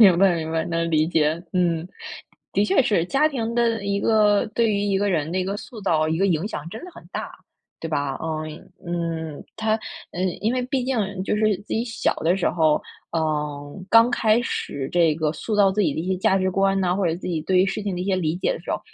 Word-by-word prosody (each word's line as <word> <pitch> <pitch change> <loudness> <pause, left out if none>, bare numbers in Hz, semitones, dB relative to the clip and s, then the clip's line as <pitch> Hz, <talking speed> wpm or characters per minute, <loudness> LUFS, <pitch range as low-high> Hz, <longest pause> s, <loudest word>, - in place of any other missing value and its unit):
明 190 -6 +8
白 190 -2 +5
明 160 -1 -3
白， 165 0 0
能 165 0 -1
理 155 0 +3
解， 160 0 +1
嗯。 170 -3 +1 0.7
的 200 - +3
确 265 - +3
是 190 -8 +2
家 285 - +2
庭 235 -5 -3
的 230 -3 +1
一 200 0 0
个 210 -2 +4
对 230 -1 +3
于 205 -1 +1
一 200 -1 +1
个 205 - +1
人 160 -5 0
的 185 - -1
一 185 - 0
个 195 +2 -2
塑 220 +1 -9
造、 155 -5 +1
一 160 +1 0
个 195 - +3
影 175 +3 0
响 150 -3 -6
真 225 - -8
的 365 - -9
很 - - -13
大， - - -4 0.5
对 - - -5
吧？ 145 -3 -1
嗯 155 -1 -4 0.3
嗯， 165 -3 -4
它 220 0 0 0.4
呃， 175 - -6 0.2
因 220 +3 +1
为 255 - 0
毕 255 0 -1
竟 255 -2 -1 0.2
就 195 - 0
是 215 -2 +2
自 205 - -17
己 230 +2 0
小 230 -2 0
的 170 +4 +1
时 190 - +1
候， 155 -3 +2 0.3
嗯， 150 +1 -3
刚 230 +3 +6
开 230 -1 +3
始 140 - -3
这 170 -3 +3
个 155 -1 0
塑 215 +5 -4
造 200 -2 +5
自 210 - -1
己 165 -8 +2
的 - - -2
一 175 - -4
些 190 - +1
价 190 - +3
值 185 -1 +1
观 195 +1 +2
啊， 180 - +2
或 195 -2 +1
者 165 - +1
自 175 - -9
己 165 -3 -1
对 185 +4 +1
于 180 - +6
事 200 +1 -3
情 200 -3 -1
的 180 - -4
一 - - -2
些 190 -1 +1
理 160 -3 0
解 180 - 0
的 - - -5
时 - - -16
候， - - -2
185 Hz, 270 characters per minute, -23 LUFS, 160-210 Hz, 0.7 s, 明